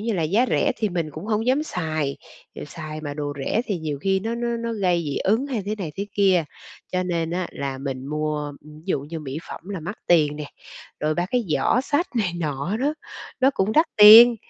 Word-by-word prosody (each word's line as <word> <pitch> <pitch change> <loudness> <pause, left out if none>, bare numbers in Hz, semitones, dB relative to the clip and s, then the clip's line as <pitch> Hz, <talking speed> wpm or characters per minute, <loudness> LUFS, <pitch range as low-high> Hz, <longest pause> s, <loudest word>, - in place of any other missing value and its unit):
như 225 +2 -1
là, 175 -5 0
giá 205 +11 +2
rẻ - - +2
thì 215 - 0
mình 170 -4 -2
cũng 155 +7 -8
hông 220 +1 0
dám 265 +4 +3
xài, 155 - -2 0.5
xài 155 0 -7
mà 145 -2 -5
đồ 145 -1 -3
rẻ 225 - +1
thì 200 -5 -2
nhiều 155 -3 -4
khi 190 +2 +1
nó 225 +3 -2
nó 235 0 -2
nó 230 0 -3
gây 180 -5 +1
dị 145 - -3
ứng 225 +8 +1
hay 250 -7 -2
thế 210 - -1
này 170 -6 -4
thế 200 +1 -3
kia, 190 -5 +3 0.5
cho 185 0 +1
nên 170 -2 -1
á 180 +1 -2
là 135 -1 -4
mình 135 -1 -5
mua 150 0 -2
ví 150 +1 -14
dụ 185 - 0
như 155 +3 -7
mỹ 140 0 -5
phẩm - - -7
là 195 -4 -4
mắc 185 +7 -6
tiền 150 -4 +3
nè, 150 - -5 0.6
rồi 155 +1 0
ba 175 +2 -1
cái 245 -2 +1
giỏ 160 +10 +2
xách 290 +6 0
này 200 -6 +1
nọ 150 +5 -2
đó, 285 +6 0 0.5
nó 265 +1 +5
cũng 195 +3 +1
đắt 315 +6 +4
tiền, 225 +3 +10
180 Hz, 230 wpm, -23 LUFS, 155-220 Hz, 0.6 s, tiền